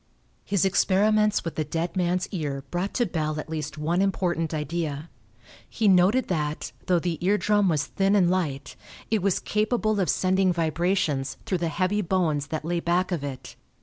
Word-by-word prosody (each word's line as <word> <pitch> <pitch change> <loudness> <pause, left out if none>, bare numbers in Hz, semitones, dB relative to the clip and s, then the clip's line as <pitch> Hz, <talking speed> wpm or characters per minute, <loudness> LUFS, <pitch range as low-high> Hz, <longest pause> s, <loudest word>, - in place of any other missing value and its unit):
His 200 -2 +1
experiments 210 +2 +2
with 165 - -3
the 155 - -1
dead 165 +4 -3
man's 180 0 0
ear 145 -7 -3
brought 180 +3 -2
to 240 - +2
Bell 155 -5 -2
at 155 - -7
least 155 -1 -4
one 165 +4 0
important 175 -4 0
idea. 155 0 -3 0.6
He 220 - 0
noted 195 +7 +4
that, 150 -4 -2 0.2
though 180 -2 +4
the 170 -2 -2
ear 200 +3 +3
drum 205 -2 +2
was 150 -4 +1
thin 195 +10 +1
and 190 -4 +4
light, 170 -7 -2 0.4
it 220 -3 +2
was 195 -1 +1
capable 215 0 0
of 185 - +1
sending 185 0 +2
vibrations 165 -4 0
through 185 - -1
the 170 - -1
heavy 185 +5 0
bones 165 -6 0
that 155 -1 -4
lay 170 +1 0
back 175 +2 0
of 165 -5 -2
it. 135 -3 -7
175 Hz, 180 wpm, -25 LUFS, 155-195 Hz, 0.6 s, noted